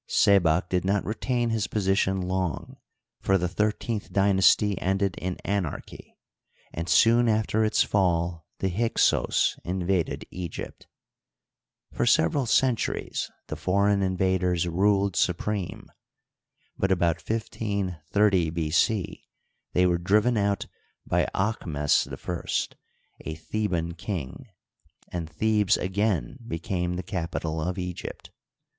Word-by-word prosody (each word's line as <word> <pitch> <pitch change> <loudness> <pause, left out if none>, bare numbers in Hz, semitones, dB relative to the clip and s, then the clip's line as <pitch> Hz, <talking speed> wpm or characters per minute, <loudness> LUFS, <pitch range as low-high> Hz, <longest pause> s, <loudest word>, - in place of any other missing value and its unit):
Sebak 90 -3 +4
did 90 -1 0
not 100 +1 0
retain 120 +3 -1
his 110 -2 0
position 95 -2 +1
long, 90 -3 -3 0.4
for 95 - +2
the 90 -1 0
thirteenth 105 +3 -2
dynasty 100 +1 +4
ended 95 0 0
in 90 0 -3
anarchy, 100 -6 -4 0.6
and 85 +1 -4
soon 115 +4 +5
after 110 0 +1
its 110 - +3
fall 85 -4 0
the 95 - -1
Hyksos 115 +6 +1
in 90 0 -3
vaded 90 -3 0
Egypt. 90 -2 -7 1.1
For - - 0
several 120 - +3
centuries 125 0 0 0.2
the - - -5
foreign 100 +2 +2
invaders 95 -2 +1
ruled 100 +2 +2
supreme; 95 +2 -1 0.9
but 95 - 0
about 85 -3 +1
1 115 +1 -1
530 100 -3 0
B. 80 -1 -2
c. 100 +3 0 0.5
they 90 - +4
were 90 -1 +2
driven 105 +7 +3
out 100 -1 0 0.4
by - - +1
Aahmes 85 -8 +1
I, 85 -1 -5
a 80 - -4
Theban 85 -1 -2
king, 90 - -5 0.6
and 85 -3 -4
Thebes 105 +4 +2
again 100 +6 -1
became 90 0 -2
the 90 - -4
capital 80 -3 -3
of 90 +4 -2
Egypt. 90 -1 -6
95 Hz, 115 wpm, -26 LUFS, 85-105 Hz, 1.1 s, soon